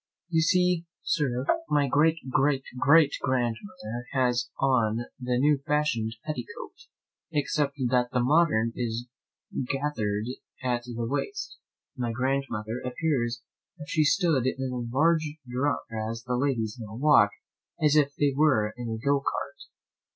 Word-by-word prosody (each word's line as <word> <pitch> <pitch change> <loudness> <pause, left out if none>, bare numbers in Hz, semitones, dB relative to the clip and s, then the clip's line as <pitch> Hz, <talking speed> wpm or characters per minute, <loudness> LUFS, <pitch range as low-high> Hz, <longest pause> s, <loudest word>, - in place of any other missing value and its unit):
You 165 -2 +2
see, 180 0 +2 0.2
Sir, 130 -4 0 0.2
my 145 -1 +3
great 155 +4 +3
great 135 +1 +2 0.2
great 145 +1 +5
grandmother 120 - -2
has 125 -2 +1
on 120 -3 +2
the 125 -1 -1
new 145 +2 +3
fashion'd 120 -7 0
petticoat, 460 - -6 0.6
except 145 -1 0
that 125 0 +2
the 125 - +1
modern 125 -4 +3
is 120 0 -3 0.7
gather'd 110 -8 -1 0.4
at 120 -2 -1
the 120 -1 -4
waist; 400 - -3 0.4
my 120 -4 -2
grandmother 120 -2 -2
appears 125 -3 -1 0.4
as - - -6
if 145 - -12
she 155 - +3
stood 150 -5 +2
in 130 0 -2
a - - -3 0.2
large 155 0 +2
drum, 130 +3 0
whereas 110 +1 -4
the 125 -1 -2
ladies 125 -4 -1
now 110 -1 -8
walk 125 -5 +5 0.5
as 150 -1 +3
if 145 -2 +3
they 145 -1 +2
were 130 -8 +3
in 120 -1 -5
a 110 - -2
go 140 +5 +2
cart. 135 - -3
130 Hz, 140 wpm, -27 LUFS, 120-150 Hz, 0.7 s, great